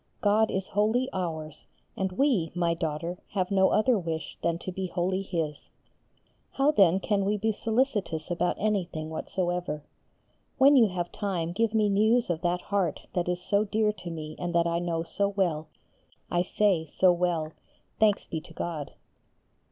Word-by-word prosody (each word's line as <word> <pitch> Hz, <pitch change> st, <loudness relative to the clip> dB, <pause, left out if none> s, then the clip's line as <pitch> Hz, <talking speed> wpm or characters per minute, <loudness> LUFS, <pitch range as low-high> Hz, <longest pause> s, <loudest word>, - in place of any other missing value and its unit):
God 215 Hz, +1 st, +3 dB
is 190 Hz, 0 st, -3 dB
wholly 220 Hz, +6 st, +1 dB
ours, 160 Hz, -4 st, -4 dB, 0.3 s
and 190 Hz, -1 st, -2 dB
we, 215 Hz, -, +2 dB
my 170 Hz, -1 st, +1 dB
daughter, 165 Hz, +1 st, -3 dB
have 185 Hz, -1 st, -1 dB
no 190 Hz, -1 st, +4 dB
other 225 Hz, 0 st, +3 dB
wish 165 Hz, -2 st, -4 dB
than 170 Hz, 0 st, 0 dB
to 185 Hz, -, -6 dB
be 185 Hz, +1 st, -3 dB
wholly 185 Hz, +2 st, -1 dB
His. 165 Hz, -6 st, -4 dB, 0.8 s
How 275 Hz, +2 st, +3 dB
then 190 Hz, -, +5 dB
can 200 Hz, 0 st, 0 dB
we 205 Hz, +2 st, +1 dB
be 220 Hz, +2 st, +1 dB
solicitous 215 Hz, -, -1 dB
about 175 Hz, 0 st, +1 dB
anything 175 Hz, -7 st, -1 dB
whatsoever? 175 Hz, -2 st, -2 dB, 0.7 s
When 280 Hz, +2 st, +7 dB
you 240 Hz, -5 st, +7 dB
have 175 Hz, -2 st, -3 dB
time 180 Hz, -5 st, -2 dB
give 225 Hz, +4 st, 0 dB
me 215 Hz, -1 st, +4 dB
news 215 Hz, +2 st, +3 dB
of 165 Hz, -1 st, -3 dB
that 175 Hz, 0 st, 0 dB
heart 195 Hz, -5 st, -1 dB
that 175 Hz, -1 st, 0 dB
is 180 Hz, 0 st, -2 dB
so 200 Hz, +1 st, +2 dB
dear 215 Hz, 0 st, +1 dB
to 180 Hz, -, -8 dB
me 155 Hz, -2 st, -6 dB
and 175 Hz, -1 st, -3 dB
that 170 Hz, 0 st, +4 dB
I 170 Hz, 0 st, 0 dB
know 170 Hz, -1 st, -1 dB
so 200 Hz, +4 st, -1 dB
well, 175 Hz, -6 st, -1 dB, 0.6 s
I 175 Hz, -, +2 dB
say, 180 Hz, -3 st, +1 dB
so 185 Hz, +5 st, +4 dB
well, 170 Hz, -3 st, 0 dB, 0.5 s
thanks 210 Hz, -2 st, +3 dB
be 160 Hz, -, -4 dB
to -, -, -15 dB
God. 155 Hz, -5 st, -4 dB
180 Hz, 170 wpm, -28 LUFS, 170-205 Hz, 0.8 s, When